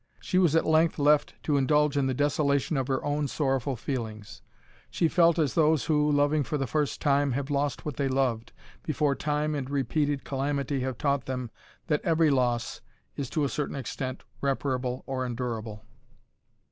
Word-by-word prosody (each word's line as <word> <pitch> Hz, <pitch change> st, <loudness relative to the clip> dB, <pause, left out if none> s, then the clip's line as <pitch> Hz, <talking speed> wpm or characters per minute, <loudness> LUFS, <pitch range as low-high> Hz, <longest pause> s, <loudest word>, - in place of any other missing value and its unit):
She 125 Hz, +11 st, 0 dB
was 170 Hz, -4 st, +3 dB
at 165 Hz, -, +3 dB
length 160 Hz, +1 st, +3 dB
left 150 Hz, 0 st, +3 dB
to 145 Hz, -2 st, +1 dB
indulge 150 Hz, +1 st, +2 dB
in 140 Hz, -2 st, +2 dB
the 130 Hz, -, -1 dB
desolation 145 Hz, +1 st, +1 dB
of 135 Hz, -2 st, -1 dB
her 135 Hz, -1 st, -1 dB
own 145 Hz, 0 st, 0 dB
sorrowful 135 Hz, -2 st, -1 dB
feelings. 110 Hz, -3 st, -5 dB, 0.5 s
She 165 Hz, -, +1 dB
felt 170 Hz, 0 st, +4 dB
as 155 Hz, -4 st, +1 dB
those 160 Hz, -2 st, +3 dB
who, 150 Hz, -2 st, +2 dB
loving 145 Hz, +1 st, +3 dB
for 145 Hz, +3 st, -2 dB
the 135 Hz, -, -1 dB
first 150 Hz, +2 st, -1 dB
time, 140 Hz, -2 st, +2 dB
have 140 Hz, +2 st, -3 dB
lost 140 Hz, -1 st, -1 dB
what 150 Hz, -3 st, -4 dB
they 140 Hz, -, 0 dB
loved, 130 Hz, -4 st, 0 dB, 0.3 s
before 150 Hz, -2 st, 0 dB
time 150 Hz, +1 st, -1 dB
and 135 Hz, -3 st, -3 dB
repeated 145 Hz, +1 st, 0 dB
calamity 140 Hz, 0 st, -2 dB
have 130 Hz, -2 st, -3 dB
taught 140 Hz, -2 st, 0 dB
them 125 Hz, -3 st, -4 dB, 0.3 s
that 150 Hz, -3 st, 0 dB
every 160 Hz, -2 st, +3 dB
loss 120 Hz, -3 st, 0 dB, 0.3 s
is 135 Hz, -3 st, -4 dB
to 155 Hz, -3 st, 0 dB
a -, -, +2 dB
certain 145 Hz, +1 st, -3 dB
extent 130 Hz, 0 st, -5 dB, 0.2 s
reparable 130 Hz, -2 st, -1 dB
or 130 Hz, -1 st, -2 dB
endurable. 115 Hz, -3 st, -4 dB
140 Hz, 175 wpm, -27 LUFS, 130-150 Hz, 0.5 s, felt